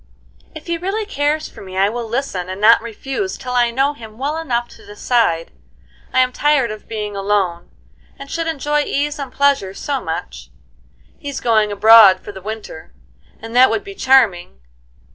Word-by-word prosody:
"If 310 Hz, -, -10 dB
he 340 Hz, -1 st, -3 dB
really 400 Hz, +5 st, -2 dB
cares 300 Hz, -4 st, -1 dB
for -, -, -14 dB
me 185 Hz, -1 st, -9 dB
I 195 Hz, +1 st, +3 dB
will 235 Hz, +2 st, -4 dB
listen, 220 Hz, -8 st, -3 dB
and 185 Hz, +1 st, -6 dB
not 225 Hz, +3 st, +6 dB
refuse 270 Hz, -, -5 dB
till 255 Hz, -1 st, -7 dB
I 240 Hz, -1 st, +3 dB
know 270 Hz, +4 st, 0 dB
him 220 Hz, -5 st, -13 dB
well 280 Hz, +4 st, -2 dB
enough 240 Hz, -7 st, -2 dB
to -, -, -16 dB
decide. 205 Hz, -5 st, 0 dB, 0.6 s
I'm 255 Hz, 0 st, +2 dB
tired 290 Hz, -6 st, +2 dB
of 215 Hz, -, -10 dB
being 210 Hz, -2 st, -5 dB
alone, 195 Hz, -4 st, -1 dB, 0.5 s
and 275 Hz, -, -10 dB
should 330 Hz, +3 st, -3 dB
enjoy 295 Hz, -1 st, -1 dB
ease 290 Hz, +1 st, -2 dB
and 275 Hz, -3 st, -6 dB
pleasure 275 Hz, -10 st, +1 dB
so 275 Hz, +2 st, -3 dB
much. -, -, -6 dB, 0.7 s
He's 285 Hz, -2 st, -5 dB
going 215 Hz, -3 st, +2 dB
abroad 205 Hz, -2 st, +7 dB
for -, -, -9 dB
the 190 Hz, -1 st, -11 dB
winter, 205 Hz, -, -8 dB, 0.4 s
and 225 Hz, +1 st, -9 dB
that 255 Hz, +1 st, +7 dB
would 400 Hz, -, -1 dB
be 395 Hz, 0 st, -9 dB
charming. 225 Hz, -, +2 dB
235 Hz, 175 wpm, -18 LUFS, 205-285 Hz, 0.7 s, abroad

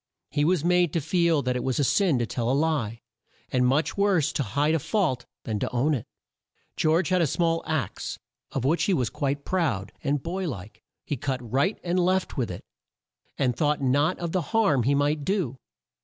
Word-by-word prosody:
He 145 Hz, -, +1 dB
was 170 Hz, -1 st, +2 dB
made 180 Hz, -3 st, +3 dB
to 165 Hz, -, +2 dB
feel 165 Hz, -1 st, +2 dB
that 125 Hz, 0 st, 0 dB
it 125 Hz, -, -2 dB
was 130 Hz, -1 st, -1 dB
a 145 Hz, -, +2 dB
sin 170 Hz, +1 st, +3 dB
to 120 Hz, -, 0 dB
tell 115 Hz, +1 st, -2 dB
a -, -, +2 dB
lie, 140 Hz, -8 st, 0 dB, 0.5 s
and 125 Hz, -1 st, +3 dB
much 140 Hz, +5 st, +1 dB
worse 190 Hz, -7 st, +2 dB
to -, -, 0 dB
hide 145 Hz, +7 st, +1 dB
a 165 Hz, -, +2 dB
fault 150 Hz, -, 0 dB, 0.2 s
than 110 Hz, -2 st, -2 dB
to -, -, -1 dB
own 130 Hz, +5 st, +1 dB
it. 125 Hz, -, -3 dB, 0.7 s
George 160 Hz, +3 st, +2 dB
had 185 Hz, -1 st, +3 dB
a 165 Hz, -, +3 dB
small 165 Hz, +3 st, +1 dB
axe 150 Hz, -, -2 dB, 0.3 s
of 130 Hz, -2 st, -2 dB
which 160 Hz, +5 st, +2 dB
he 195 Hz, -, +2 dB
was 125 Hz, -7 st, 0 dB
quite 140 Hz, 0 st, -2 dB
proud, 140 Hz, -, -1 dB
and 145 Hz, -2 st, 0 dB
boy 180 Hz, +1 st, -2 dB
like, 105 Hz, -2 st, -8 dB, 0.2 s
he 145 Hz, -, -2 dB
cut 130 Hz, +1 st, -2 dB
right 140 Hz, -, +1 dB
and 180 Hz, +1 st, 0 dB
left 185 Hz, +1 st, +1 dB
with 125 Hz, -6 st, -1 dB
it, 90 Hz, -, -7 dB, 0.7 s
and 125 Hz, -3 st, +1 dB
thought 150 Hz, -2 st, +1 dB
not 145 Hz, +6 st, +2 dB
of 170 Hz, -1 st, -3 dB
the 185 Hz, -, +1 dB, 0.2 s
harm 195 Hz, -, +4 dB
he 135 Hz, +5 st, +2 dB
might 145 Hz, +1 st, +1 dB
do. 165 Hz, -, -1 dB
145 Hz, 205 wpm, -26 LUFS, 130-170 Hz, 0.7 s, harm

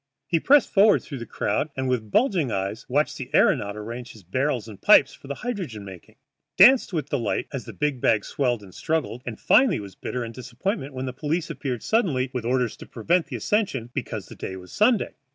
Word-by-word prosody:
He 165 Hz, +3 st, +1 dB
pressed 285 Hz, -, +4 dB
forward 205 Hz, +1 st, +5 dB
through 140 Hz, -4 st, -7 dB
the 120 Hz, -, -7 dB
crowd 105 Hz, +11 st, -1 dB
and, 130 Hz, 0 st, -1 dB
with 120 Hz, -4 st, -1 dB
bulging 185 Hz, -, +2 dB
eyes, 95 Hz, -1 st, -3 dB
watched -, -, +1 dB
the -, -, -7 dB
aëronaut 100 Hz, 0 st, +3 dB
arrange 115 Hz, +4 st, -7 dB
his 110 Hz, -, -15 dB
barrels 130 Hz, -, -1 dB
and 100 Hz, -3 st, -11 dB
pipes 135 Hz, -1 st, +6 dB
for -, -, -14 dB
the 140 Hz, -, -4 dB
hydrogen 175 Hz, -, -4 dB
making, 95 Hz, -3 st, -12 dB, 0.4 s
danced 245 Hz, +6 st, +7 dB
with 155 Hz, -5 st, -3 dB
delight 120 Hz, -7 st, -1 dB
as 135 Hz, -, -4 dB
the -, -, -8 dB
great 150 Hz, -4 st, -1 dB
bag 105 Hz, -2 st, +2 dB
swelled 120 Hz, -6 st, -1 dB
and 95 Hz, -2 st, -14 dB
struggled, 155 Hz, -4 st, -2 dB
and 115 Hz, -, -5 dB
finally 250 Hz, -, +4 dB
was 100 Hz, -2 st, -9 dB
bitter 125 Hz, +5 st, -4 dB
in 115 Hz, -, -7 dB
disappointment 135 Hz, -, -4 dB
when 130 Hz, 0 st, -3 dB
the 130 Hz, -, -4 dB
police 155 Hz, +5 st, -2 dB
appeared 125 Hz, -5 st, -4 dB
suddenly 145 Hz, -, +1 dB
with 125 Hz, -3 st, -3 dB
orders 125 Hz, -1 st, 0 dB
to -, -, -11 dB
prevent 165 Hz, +10 st, 0 dB
the -, -, -6 dB
ascension, 140 Hz, -, -1 dB
because -, -, -4 dB
the -, -, -12 dB
day 95 Hz, -, -6 dB
was 90 Hz, -1 st, -11 dB
Sunday. 215 Hz, 0 st, +2 dB
130 Hz, 210 wpm, -24 LUFS, 115-165 Hz, 0.4 s, danced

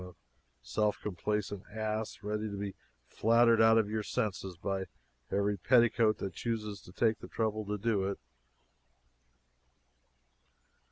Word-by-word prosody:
A 90 Hz, -1 st, -10 dB, 0.5 s
self 105 Hz, -, 0 dB
complacent 105 Hz, 0 st, -2 dB
ass, 110 Hz, -1 st, -3 dB
ready 105 Hz, +1 st, -2 dB
to 100 Hz, -, -5 dB
be 100 Hz, -1 st, -4 dB, 0.3 s
flattered 115 Hz, 0 st, +4 dB
out 110 Hz, 0 st, +6 dB
of 110 Hz, -2 st, +3 dB
your 110 Hz, +1 st, -1 dB
senses 100 Hz, -5 st, -3 dB
by 95 Hz, +1 st, -2 dB, 0.4 s
every 100 Hz, +1 st, +1 dB
petticoat 115 Hz, 0 st, +4 dB
that 95 Hz, -3 st, -4 dB
chooses 105 Hz, -3 st, -3 dB
to -, -, -14 dB
take 110 Hz, +3 st, +1 dB
the -, -, -9 dB
trouble 110 Hz, -1 st, -1 dB
to 105 Hz, +1 st, -2 dB
do 105 Hz, -2 st, +1 dB
it!" 100 Hz, -, -3 dB
105 Hz, 130 wpm, -32 LUFS, 100-110 Hz, 0.5 s, out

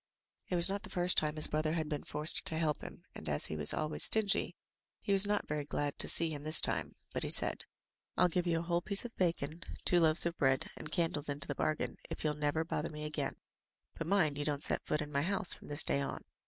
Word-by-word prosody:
It 180 Hz, -, -2 dB
was 170 Hz, -1 st, +4 dB
not 200 Hz, +1 st, -1 dB
the -, -, -12 dB
first 180 Hz, 0 st, -1 dB
time 150 Hz, 0 st, 0 dB
his 155 Hz, -, +1 dB
brother 155 Hz, +1 st, -2 dB
had 160 Hz, -2 st, -3 dB
been 150 Hz, -2 st, -5 dB
forced 150 Hz, +2 st, +2 dB
to 160 Hz, -, +3 dB
help 155 Hz, -2 st, -2 dB
him, -, -, -11 dB
and, 80 Hz, -, -9 dB
as 75 Hz, -, -1 dB
he -, -, -5 dB
was 75 Hz, -1 st, +2 dB
always 155 Hz, 0 st, -1 dB
stingy, 215 Hz, -3 st, +2 dB, 0.4 s
he 200 Hz, -, -2 dB
was 195 Hz, +1 st, +2 dB
not 205 Hz, 0 st, -2 dB
very 150 Hz, 0 st, -4 dB
glad 145 Hz, 0 st, -4 dB
to -, -, +5 dB
see 165 Hz, -1 st, +1 dB
him 145 Hz, -2 st, -7 dB
this 155 Hz, +2 st, +6 dB
time, -, -, +6 dB, 0.2 s
but -, -, -4 dB
he -, -, -3 dB
said, -, -, +2 dB, 0.5 s
"Fll 180 Hz, -, +2 dB
give 180 Hz, +1 st, -2 dB
you 165 Hz, -1 st, 0 dB
a -, -, -3 dB
whole 170 Hz, 0 st, -2 dB
piece 200 Hz, +4 st, +2 dB
of 235 Hz, -, -10 dB
bacon, 165 Hz, -2 st, -3 dB, 0.2 s
two 175 Hz, -, +5 dB
loaves 160 Hz, 0 st, +2 dB
of 170 Hz, 0 st, -3 dB
bread, 135 Hz, -1 st, 0 dB
and 155 Hz, -, -9 dB
candles 155 Hz, -2 st, 0 dB
into 140 Hz, 0 st, -4 dB
the 145 Hz, -, -4 dB
bargain, 155 Hz, +2 st, -3 dB
if -, -, -7 dB
you'll 155 Hz, -1 st, -1 dB
never 150 Hz, +2 st, -2 dB
bother 160 Hz, 0 st, -4 dB
me 150 Hz, 0 st, -9 dB
again 150 Hz, 0 st, -5 dB, 0.3 s
— -, -, -54 dB
^but 165 Hz, -, -5 dB
mind 165 Hz, -7 st, 0 dB
you -, -, -2 dB
don't 145 Hz, -1 st, -3 dB
set -, -, 0 dB
foot 150 Hz, -, -3 dB
in 150 Hz, 0 st, -7 dB
my 140 Hz, -1 st, -1 dB
house 190 Hz, +2 st, +4 dB
from -, -, -13 dB
this 145 Hz, +1 st, +5 dB
day 140 Hz, -, 0 dB
on." 140 Hz, -, -6 dB
155 Hz, 255 wpm, -32 LUFS, 145-175 Hz, 0.5 s, this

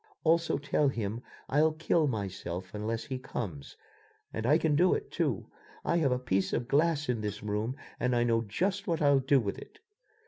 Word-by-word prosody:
Also 165 Hz, +1 st, +3 dB
tell 145 Hz, +1 st, +1 dB
him 115 Hz, -3 st, -2 dB, 0.3 s
I'll 155 Hz, +2 st, +3 dB
kill 160 Hz, 0 st, +2 dB
myself 95 Hz, -5 st, -4 dB
unless 110 Hz, +2 st, -2 dB
he 130 Hz, -2 st, -4 dB
comes, 95 Hz, -, -6 dB, 0.6 s
and 110 Hz, +1 st, -2 dB
I 150 Hz, +4 st, +6 dB
can 160 Hz, -3 st, +1 dB
do 180 Hz, +5 st, +4 dB
it, 420 Hz, -1 st, -5 dB
too. -, -, -1 dB, 0.4 s
I 170 Hz, -, +2 dB
have 145 Hz, -6 st, +2 dB
a 125 Hz, -, +2 dB
piece 95 Hz, -6 st, 0 dB
of 120 Hz, -, -1 dB
glass 150 Hz, +1 st, +2 dB
in 120 Hz, -3 st, 0 dB
this 105 Hz, 0 st, -4 dB
room 105 Hz, +4 st, -1 dB, 0.2 s
and 125 Hz, 0 st, +1 dB
I 120 Hz, -, +3 dB
know 115 Hz, -1 st, +2 dB
just 190 Hz, -, -1 dB
what 165 Hz, -3 st, 0 dB
I'll 140 Hz, -1 st, +5 dB
do 135 Hz, +1 st, +3 dB
with 100 Hz, -5 st, -3 dB
it." -, -, -13 dB
125 Hz, 195 wpm, -30 LUFS, 105-155 Hz, 0.6 s, I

